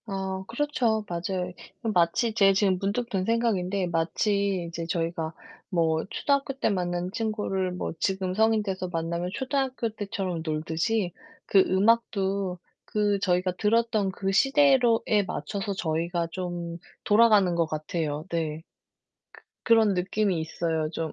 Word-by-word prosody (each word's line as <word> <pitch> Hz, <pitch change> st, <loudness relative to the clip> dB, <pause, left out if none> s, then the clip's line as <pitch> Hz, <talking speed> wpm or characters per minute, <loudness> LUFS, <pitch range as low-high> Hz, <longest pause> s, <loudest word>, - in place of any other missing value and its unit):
아 190 Hz, -1 st, -3 dB
그렇죠. 240 Hz, -5 st, 0 dB
맞아요. 180 Hz, +1 st, -3 dB, 0.3 s
음 225 Hz, -, +1 dB
마치 180 Hz, +6 st, +2 dB
제 195 Hz, -3 st, +5 dB
지금 195 Hz, -2 st, +2 dB
문득 210 Hz, +5 st, -1 dB
든 190 Hz, -5 st, -1 dB
생각인데 200 Hz, -4 st, 0 dB
마치 185 Hz, +3 st, 0 dB
이제 165 Hz, 0 st, -5 dB
저희가 165 Hz, -1 st, -2 dB, 0.4 s
뭐 160 Hz, -3 st, +1 dB
초등학교 280 Hz, -1 st, 0 dB
때 270 Hz, -, 0 dB
만난 180 Hz, -2 st, -1 dB
친구를 205 Hz, -4 st, -1 dB
뭐 180 Hz, -, -4 dB
지금 190 Hz, -1 st, -1 dB
성인 220 Hz, +1 st, +3 dB
돼서 190 Hz, -2 st, -3 dB
만나면 170 Hz, +1 st, -2 dB
초등학교 265 Hz, -2 st, -1 dB
때처럼 195 Hz, -5 st, -4 dB
놀듯이 165 Hz, +5 st, -1 dB, 0.3 s
그 195 Hz, -, +4 dB
음악도 195 Hz, -2 st, +1 dB, 0.3 s
그 205 Hz, -1 st, +1 dB
저희가 185 Hz, -1 st, +1 dB
들었던 220 Hz, -2 st, +2 dB
그 195 Hz, 0 st, -2 dB
시대로에 250 Hz, -4 st, +4 dB
맞춰서 200 Hz, -1 st, -3 dB
저희가 170 Hz, -1 st, -1 dB
좀 175 Hz, -2 st, -4 dB, 0.3 s
돌아가는 210 Hz, -4 st, +5 dB
것 170 Hz, -1 st, +1 dB
같아요. 155 Hz, -1 st, -3 dB
네. 160 Hz, -2 st, -2 dB, 1.0 s
그 230 Hz, -, +6 dB
그런 220 Hz, -3 st, +4 dB
느낌이 185 Hz, 0 st, 0 dB
있어요 160 Hz, -1 st, -2 dB
좀. 160 Hz, -2 st, -4 dB
190 Hz, 285 characters per minute, -27 LUFS, 170-215 Hz, 1.0 s, 그